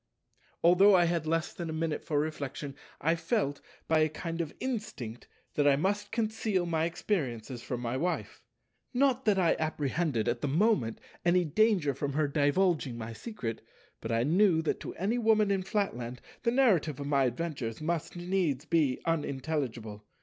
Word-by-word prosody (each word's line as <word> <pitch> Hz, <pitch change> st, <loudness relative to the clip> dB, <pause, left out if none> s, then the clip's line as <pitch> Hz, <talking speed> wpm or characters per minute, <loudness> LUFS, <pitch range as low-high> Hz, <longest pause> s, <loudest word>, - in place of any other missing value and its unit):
Although 190 Hz, +4 st, +7 dB
I 175 Hz, -1 st, +5 dB
had 170 Hz, -2 st, 0 dB
less 165 Hz, +1 st, 0 dB
than 170 Hz, -2 st, -5 dB
a -, -, -3 dB
minute 160 Hz, -1 st, -2 dB
for 150 Hz, -3 st, 0 dB
reflection, 145 Hz, -2 st, -4 dB, 0.2 s
I 165 Hz, +3 st, +2 dB
felt, 165 Hz, -, -1 dB, 0.3 s
by 160 Hz, -1 st, +3 dB
a 155 Hz, 0 st, +3 dB
kind 165 Hz, +2 st, -4 dB
of 160 Hz, -3 st, -4 dB
instinct, 215 Hz, -, -5 dB, 0.3 s
that 145 Hz, -1 st, +2 dB
I 140 Hz, -, +6 dB
must 205 Hz, +7 st, -1 dB
conceal 220 Hz, -4 st, 0 dB
my 165 Hz, -1 st, +1 dB
experiences 130 Hz, -, -2 dB
from 125 Hz, -1 st, -4 dB
my 120 Hz, +1 st, -2 dB
Wife. 175 Hz, +6 st, -2 dB, 0.5 s
Not 265 Hz, 0 st, +2 dB
that 210 Hz, -3 st, +3 dB
I 175 Hz, -3 st, +3 dB
apprehended, 150 Hz, -5 st, -1 dB
at 120 Hz, 0 st, 0 dB
the -, -, 0 dB
moment, 145 Hz, -, +2 dB, 0.2 s
any 175 Hz, 0 st, +3 dB
danger 180 Hz, -3 st, +2 dB
from 140 Hz, +2 st, -3 dB
her 150 Hz, +1 st, +2 dB
divulging 145 Hz, -2 st, +1 dB
my 115 Hz, 0 st, -6 dB
secret, 115 Hz, -, -5 dB, 0.4 s
but 115 Hz, -, -5 dB
I 115 Hz, +1 st, +2 dB
knew 170 Hz, +2 st, +3 dB
that 160 Hz, -, -1 dB
to -, -, -7 dB
any 210 Hz, +7 st, 0 dB
Woman 215 Hz, -3 st, +3 dB
in 195 Hz, -1 st, +1 dB
Flatland 125 Hz, -, -2 dB, 0.2 s
the 235 Hz, -, +1 dB
narrative 195 Hz, -, +3 dB
of 140 Hz, -, -4 dB
my 140 Hz, -2 st, +3 dB
adventures 125 Hz, -3 st, -3 dB
must 165 Hz, +1 st, -2 dB
needs 175 Hz, -6 st, -1 dB
be 155 Hz, -6 st, +2 dB
unintelligible. 135 Hz, -8 st, -2 dB
160 Hz, 170 wpm, -30 LUFS, 140-190 Hz, 0.5 s, Although